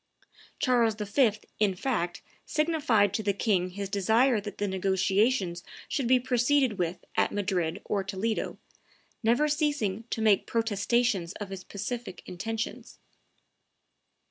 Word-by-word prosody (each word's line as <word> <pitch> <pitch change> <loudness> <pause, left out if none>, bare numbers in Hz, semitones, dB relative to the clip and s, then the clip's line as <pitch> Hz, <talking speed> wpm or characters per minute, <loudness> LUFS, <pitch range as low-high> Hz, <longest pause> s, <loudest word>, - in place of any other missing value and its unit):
Charles 235 -4 +2
V., 215 +2 +2 0.3
in 205 -3 +2
fact, 180 -6 -2 0.2
signified 290 - +2
to 220 - 0
the 200 -1 +1
king 190 -3 +1
his 200 +2 -5
desire 220 +4 +3
that 205 -1 -7
the 205 - -1
negotiations 190 0 +1 0.2
should 265 -4 -1
be 255 +1 +5
proceeded 250 -2 +2
with 175 0 -2
at - - +2
Madrid 190 -3 -1
or 200 -2 0
Toledo, 200 +3 -2 0.6
never 240 +6 +3
ceasing 290 -9 0
to - - -2
make 215 -3 +3
protestations 225 -4 +1
of 205 -2 -7
his 190 -1 -7
pacific 225 +1 -6
intentions. 220 +5 -5
210 Hz, 125 wpm, -28 LUFS, 190-240 Hz, 0.6 s, be